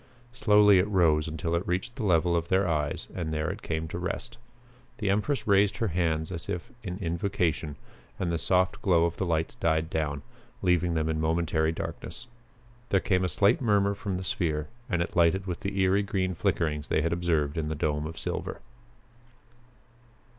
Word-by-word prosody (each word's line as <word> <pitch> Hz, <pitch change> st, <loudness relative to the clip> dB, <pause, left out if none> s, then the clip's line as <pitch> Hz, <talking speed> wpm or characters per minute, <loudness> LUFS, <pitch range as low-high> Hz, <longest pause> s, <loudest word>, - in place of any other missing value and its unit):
Slowly 105 Hz, -4 st, +5 dB
it 90 Hz, -, +2 dB
rose 80 Hz, -6 st, +3 dB
until 80 Hz, +1 st, -3 dB
it 85 Hz, +2 st, -1 dB
reached 95 Hz, +7 st, -2 dB
the 130 Hz, -, -4 dB
level 85 Hz, -3 st, +3 dB
of 85 Hz, 0 st, 0 dB
their 95 Hz, +1 st, +2 dB
eyes 75 Hz, -3 st, -1 dB
and 85 Hz, -4 st, -3 dB
there 75 Hz, +2 st, -1 dB
it 100 Hz, +3 st, -8 dB
came 80 Hz, 0 st, -3 dB
to 85 Hz, -, -4 dB
rest. 115 Hz, +6 st, -5 dB, 0.6 s
The 105 Hz, -4 st, 0 dB
empress 105 Hz, +8 st, 0 dB
raised 100 Hz, -1 st, +3 dB
her 115 Hz, 0 st, 0 dB
hands 80 Hz, -1 st, 0 dB
as 85 Hz, -2 st, -5 dB
if 90 Hz, +8 st, -4 dB
in 90 Hz, -3 st, -5 dB
invocation 85 Hz, -4 st, -1 dB, 0.4 s
and 90 Hz, -2 st, -1 dB
the 85 Hz, -, -1 dB
soft 90 Hz, +1 st, +1 dB
glow 85 Hz, -4 st, +4 dB
of 85 Hz, -, -2 dB
the 95 Hz, -, -1 dB
lights 80 Hz, -1 st, 0 dB
died 80 Hz, 0 st, 0 dB
down, 75 Hz, -3 st, -2 dB, 0.4 s
leaving 90 Hz, -2 st, +2 dB
them 80 Hz, -1 st, 0 dB
in 80 Hz, -1 st, -1 dB
momentary 80 Hz, 0 st, +1 dB
darkness. 100 Hz, +7 st, -6 dB, 0.6 s
There 95 Hz, -, +4 dB
came 90 Hz, -1 st, +1 dB
a 90 Hz, -, +1 dB
slight 100 Hz, +8 st, +3 dB
murmur 100 Hz, -4 st, +3 dB
from 100 Hz, -2 st, -3 dB
the 95 Hz, -, -5 dB
sphere, 75 Hz, -5 st, -1 dB, 0.2 s
and 90 Hz, -4 st, +1 dB
it -, -, -8 dB
lighted 90 Hz, +2 st, +3 dB
with 90 Hz, -3 st, -4 dB
the 100 Hz, 0 st, -3 dB
eery 95 Hz, +2 st, +3 dB
green 95 Hz, -2 st, -1 dB
flickerings 80 Hz, -5 st, -1 dB
they 75 Hz, -, +1 dB
had 85 Hz, -, +1 dB
observed 80 Hz, -4 st, 0 dB
in 80 Hz, -2 st, -2 dB
the 80 Hz, -, -2 dB
dome 75 Hz, 0 st, -1 dB
of 80 Hz, 0 st, -8 dB
silver. -, -, -4 dB
85 Hz, 190 wpm, -28 LUFS, 80-95 Hz, 0.6 s, Slowly